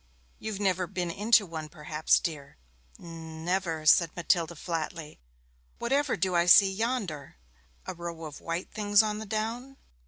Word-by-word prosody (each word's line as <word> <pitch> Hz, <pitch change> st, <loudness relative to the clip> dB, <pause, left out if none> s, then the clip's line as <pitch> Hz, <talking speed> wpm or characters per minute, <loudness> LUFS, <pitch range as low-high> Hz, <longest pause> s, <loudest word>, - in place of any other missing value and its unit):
'You've 215 Hz, -2 st, -5 dB
never 185 Hz, -3 st, 0 dB
been 175 Hz, -1 st, -3 dB
into 210 Hz, +3 st, +3 dB
one 160 Hz, -3 st, -7 dB
perhaps, 150 Hz, 0 st, +1 dB
dear?' 145 Hz, -4 st, -6 dB, 0.4 s
'N 160 Hz, -1 st, -9 dB
never,' 175 Hz, -4 st, -1 dB
said 165 Hz, +2 st, +6 dB
Matilda 170 Hz, -1 st, 0 dB
flatly. 160 Hz, -1 st, -5 dB, 0.6 s
'Whatever 275 Hz, 0 st, 0 dB
do 185 Hz, +1 st, 0 dB
I 170 Hz, 0 st, +2 dB
see 190 Hz, +2 st, +7 dB
yonder 200 Hz, -, -3 dB, 0.5 s
a -, -, -4 dB
row 170 Hz, -1 st, -7 dB
of 150 Hz, -2 st, -9 dB
white 170 Hz, +2 st, -4 dB
things 205 Hz, 0 st, +3 dB
on 210 Hz, -1 st, -2 dB
the 220 Hz, -, -7 dB
down?' 230 Hz, +5 st, -4 dB
175 Hz, 150 wpm, -28 LUFS, 165-210 Hz, 0.6 s, see